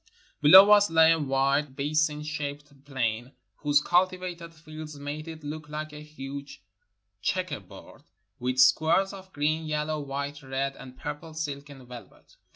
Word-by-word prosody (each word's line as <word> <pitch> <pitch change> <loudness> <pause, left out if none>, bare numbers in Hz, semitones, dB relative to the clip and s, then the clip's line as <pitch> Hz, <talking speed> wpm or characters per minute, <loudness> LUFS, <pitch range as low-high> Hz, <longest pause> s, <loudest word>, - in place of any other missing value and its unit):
Below 190 +7 +9
us 205 0 +6
lay 160 0 +6
a 165 - +2
wide, 140 0 0
basin 150 +1 0
shaped 145 -2 -6
plain, 120 -2 -2 0.2
whose 145 0 +2
cultivated 180 -1 0
fields 155 -1 -10
made 145 +2 -6
it 160 -1 -9
look 150 +1 -7
like 155 0 -6
a 150 - -9
huge 140 -2 -9 0.6
checker 185 - -1
board, 95 -3 -15 0.4
with 125 +1 -2
squares 160 +9 +4
of 190 -1 -11
green, 155 +1 -1
yellow, 155 0 -2
white, 140 +1 -5
red, 135 0 -3
and 130 -1 -12
purple 150 +3 -7
silk 145 -2 -5
and 135 -3 -13
velvet. 125 -1 -13
150 Hz, 150 wpm, -27 LUFS, 140-160 Hz, 0.6 s, Below